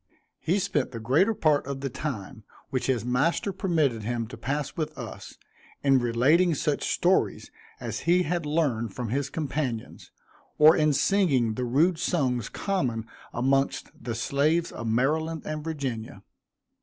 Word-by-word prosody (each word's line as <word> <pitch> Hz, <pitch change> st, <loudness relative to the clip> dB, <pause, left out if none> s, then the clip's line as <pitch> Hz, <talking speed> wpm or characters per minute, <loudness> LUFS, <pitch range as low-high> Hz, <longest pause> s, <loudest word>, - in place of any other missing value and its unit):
He 175 Hz, +5 st, +1 dB
spent 185 Hz, -10 st, -1 dB
the 115 Hz, -, -5 dB
greater 150 Hz, -, +2 dB
part 150 Hz, -6 st, +2 dB
of 140 Hz, -1 st, -4 dB
the 135 Hz, -, -2 dB
time, 125 Hz, -5 st, -5 dB, 0.3 s
which 130 Hz, -2 st, -1 dB
his 125 Hz, -4 st, 0 dB
master 145 Hz, +10 st, +1 dB
permitted 155 Hz, -, +1 dB
him 115 Hz, +1 st, -2 dB
to 130 Hz, -, -8 dB
pass 140 Hz, +3 st, -3 dB
with 155 Hz, -1 st, -3 dB
us, 120 Hz, -4 st, -8 dB, 0.5 s
in 135 Hz, -2 st, +5 dB
relating 140 Hz, +9 st, +3 dB
such -, -, -1 dB
stories -, -, +1 dB, 0.3 s
as 115 Hz, -1 st, -4 dB
he 180 Hz, +1 st, +5 dB
had 175 Hz, +1 st, -1 dB
learned 140 Hz, -9 st, 0 dB
from 120 Hz, -3 st, -4 dB
his 140 Hz, +3 st, -1 dB
companions, 140 Hz, -6 st, -4 dB, 0.5 s
or 155 Hz, +2 st, +8 dB
in 155 Hz, 0 st, +3 dB
singing 140 Hz, -, +2 dB
the 125 Hz, +3 st, -2 dB
rude 160 Hz, +8 st, +2 dB
songs 130 Hz, -, 0 dB
common 125 Hz, -, -2 dB, 0.3 s
amongst 135 Hz, +3 st, 0 dB
the 115 Hz, -1 st, -5 dB
slaves 150 Hz, +7 st, +1 dB
of 115 Hz, -, -6 dB
Maryland 155 Hz, +7 st, 0 dB
and 155 Hz, -1 st, -4 dB
Virginia. 135 Hz, -8 st, -4 dB
140 Hz, 150 wpm, -27 LUFS, 120-160 Hz, 0.5 s, or